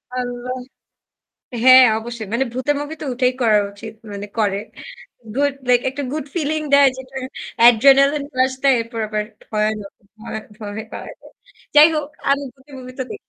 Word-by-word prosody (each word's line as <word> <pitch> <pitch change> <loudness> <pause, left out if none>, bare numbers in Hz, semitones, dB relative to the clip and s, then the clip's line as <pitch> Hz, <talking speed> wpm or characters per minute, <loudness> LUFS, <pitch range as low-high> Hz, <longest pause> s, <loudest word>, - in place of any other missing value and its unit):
আল্লাহ। 250 0 -4 1.1
হ্যাঁ, 260 0 +9
অবশ্যই। 235 -1 -7
মানে 240 +3 +1
ভূতের 260 +4 -1
movie 300 +2 -6
তো - - -4
ওটাই 250 +1 +2
করা 215 -2 +4
উচিত। 215 +2 -10 0.2
মানে 200 0 -6
করে। 200 -2 +1 0.8
Good 285 0 +2 0.2
like 245 -1 +4
একটা 285 +2 -5
good 305 -2 -4
feeling 310 -1 -1
দেয় 280 -1 +7
যেটা 260 0 -11 0.5
adrenaline 275 +4 +5
rush 260 0 +2
দেয়, 275 -1 +5
এরপর 230 0 -6
আবার 210 -1 -2 0.3
ভয়ানক, 215 -1 -2 0.3
ভয়ে 220 0 -6 0.2
ভয়ে 210 +1 -6
পাওয়ায় - - -8
দেয়। - - -17 0.4
যাই 300 +2 +9
হোক, 300 -2 -2 0.2
আমি 280 +1 +2
ভূতের 275 +1 -17
movie 255 0 -10
তো - - -1
দে - - -5
255 Hz, 165 wpm, -20 LUFS, 220-280 Hz, 1.1 s, হ্যাঁ